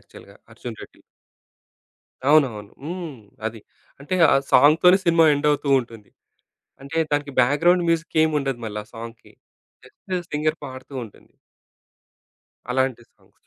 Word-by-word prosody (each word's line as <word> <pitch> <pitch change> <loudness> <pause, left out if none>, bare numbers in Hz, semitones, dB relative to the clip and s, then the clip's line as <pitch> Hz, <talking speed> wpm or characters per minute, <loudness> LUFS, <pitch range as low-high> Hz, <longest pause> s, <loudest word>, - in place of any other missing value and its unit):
యాక్చువల్‌గా - - -16 0.2
'అర్జున్ - - -9
రెడ్డి'. - - -15 1.3
అవునవును. 120 -9 +2
హ్మ్. 165 -2 -6 0.3
అది 110 0 -6 0.4
అంటే 150 +6 -4 0.2
ఆ - - +5 0.2
సాంగ్‌తోనే 165 +6 +6
సినిమా 165 -2 +4
ఎండ్ 145 +1 -2
అవుతూ 145 -1 -1
ఉంటుంది. 115 -3 -13 0.7
అంటే 140 +4 -7 0.2
దానికి 145 -1 -1
బ్యాక్‌గ్రౌండ్ 170 +7 +3
మ్యూజిక్ 165 -1 -1
ఏమి 155 -1 -1
ఉండదు 135 -4 -3
మళ్ళా 105 -1 -5
ఆ - - -26
సాంగ్‌కి 115 0 -10 0.5
జస్ట్ 185 +8 -8 0.2
సింగర్ 155 +1 0
పాడుతూ 130 +1 -11
ఉంటుంది. 110 - -18 1.4
అలాంటి 130 -2 0
సాంగ్స్. - - -32
145 Hz, 125 wpm, -22 LUFS, 120-160 Hz, 1.4 s, సాంగ్‌తోనే